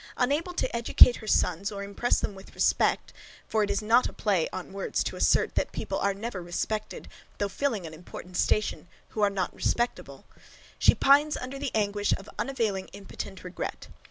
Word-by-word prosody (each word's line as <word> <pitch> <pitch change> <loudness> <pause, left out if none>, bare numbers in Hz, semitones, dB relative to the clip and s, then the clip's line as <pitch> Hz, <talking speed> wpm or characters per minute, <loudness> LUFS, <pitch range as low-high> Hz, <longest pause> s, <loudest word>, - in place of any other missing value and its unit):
Unable 295 +8 0
to - - -1
educate 235 +1 +6
her 220 - -10
sons, 195 +1 +1
or 200 -1 -5
impress 200 +4 0
them - - -3
with 190 0 -14
respect; - - +2 0.3
for 220 - 0
it 205 - +1
is 200 - -1
not 230 +4 +4
a - - -12
play 190 -7 +1
on 185 - -7
words 195 - -1
to - - -4
assert, - - +2
that - - -1
people - - -3
are 200 -1 +1
never 205 -2 -5
respected, 210 +5 -4 0.3
though 205 - 0
filling 220 -3 -2
an 160 - -8
important 180 +2 -10
station, 210 -1 0 0.2
who 215 - -4
are 205 - +5
not 190 -3 -2
respectable; 240 0 -2 0.5
she - - +6
pines 290 +2 +4
under 260 +2 -6
the 280 -1 -2
anguish 205 -1 +1
of 195 - -12
unavailing 225 -8 -1
impotent 195 -1 -8
regret. 180 0 -6
205 Hz, 185 wpm, -28 LUFS, 195-240 Hz, 0.5 s, educate